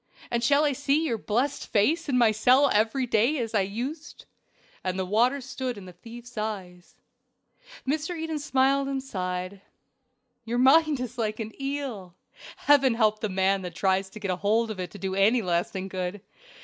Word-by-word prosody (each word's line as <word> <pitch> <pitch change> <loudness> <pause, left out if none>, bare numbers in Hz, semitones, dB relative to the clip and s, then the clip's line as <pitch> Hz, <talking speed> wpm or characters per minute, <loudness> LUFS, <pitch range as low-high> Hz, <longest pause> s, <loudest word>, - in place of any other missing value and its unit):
and 235 -1 0
shall 280 +4 +4
I 290 - +2
see 285 +4 +1
your 235 -7 -1
blessed 255 +8 -1
face 300 +10 +1
in 255 - +2
my 235 -3 +5
cell 255 +6 +4
every 225 +5 +2
day 240 +6 +2
as 230 -3 -3
I 210 - +3
used?" 255 - -5 0.6
And 185 0 -2
the 190 - -1
water 240 +8 +2
stood 255 -2 -4
in 195 - -10
the 180 - -11
thief's 235 +5 -10
eyes. 195 0 -6 0.9
Mr. 315 +5 -1
Eden 320 -1 -3
smiled 275 0 +2
and 270 -1 -3
sighed. 185 -4 -4 0.8
"Your 235 +1 -2
mind 290 +3 +5
is 250 -1 -6
like 215 -1 -2
an 220 -1 -4
eel 270 -10 -4 0.4
Heaven 275 -4 +4
help 215 -2 +2
the 215 - -2
man 190 +1 +1
that 180 -2 -7
tries 190 0 +1
to 215 - -10
get 200 -3 -2
hold 215 +5 +1
of 205 - -7
it 180 -1 -4
to - - -11
do 190 -1 -3
it 195 - -1
any 225 +4 +4
lasting 180 +2 -1
good. 185 +1 -4
230 Hz, 185 wpm, -26 LUFS, 195-270 Hz, 0.9 s, my